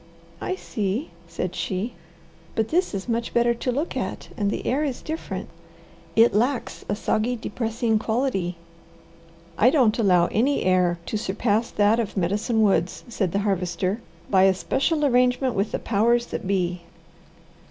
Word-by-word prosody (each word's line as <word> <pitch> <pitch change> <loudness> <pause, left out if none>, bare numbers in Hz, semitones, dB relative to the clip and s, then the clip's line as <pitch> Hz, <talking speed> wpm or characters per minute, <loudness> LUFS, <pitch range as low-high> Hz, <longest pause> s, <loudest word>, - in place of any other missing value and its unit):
"I 375 - -1
see," 215 - -3 0.2
said 180 +1 -4
she. 195 +6 -2 0.6
"But 220 0 0
this 355 - +1
is 195 +2 -4
much 235 0 -2
better 235 0 +4
to 245 +2 -2
look 290 +7 -2
at - - -4
and 205 -4 0
the - - -3
air 275 +4 +1
is 275 -5 -3
different. 320 +1 -5 0.7
It 225 +1 +6
lacks 245 +5 0
a 205 - +1
soggy, 220 +3 0
depressing 225 0 -1
quality." 220 -7 -1 1.0
"I 240 - +7
don't 250 -6 +3
allow 180 -5 +4
any 265 +6 +2
air 180 -2 +3
to 215 - -2
surpass 210 +2 0
that 210 +2 +3
of 215 -3 -3
Medicine 210 +5 +1
Woods," 190 -3 +1
said 195 -6 -1
the 195 - 0
Harvester, 185 +2 -1 0.3
"by 190 -1 +5
especial 275 - +1
arrangement 250 0 +3
with 200 +1 -1
the - - 0
powers 235 +3 +2
that 190 - -5
be." 180 -2 0
220 Hz, 155 wpm, -24 LUFS, 195-245 Hz, 1.0 s, I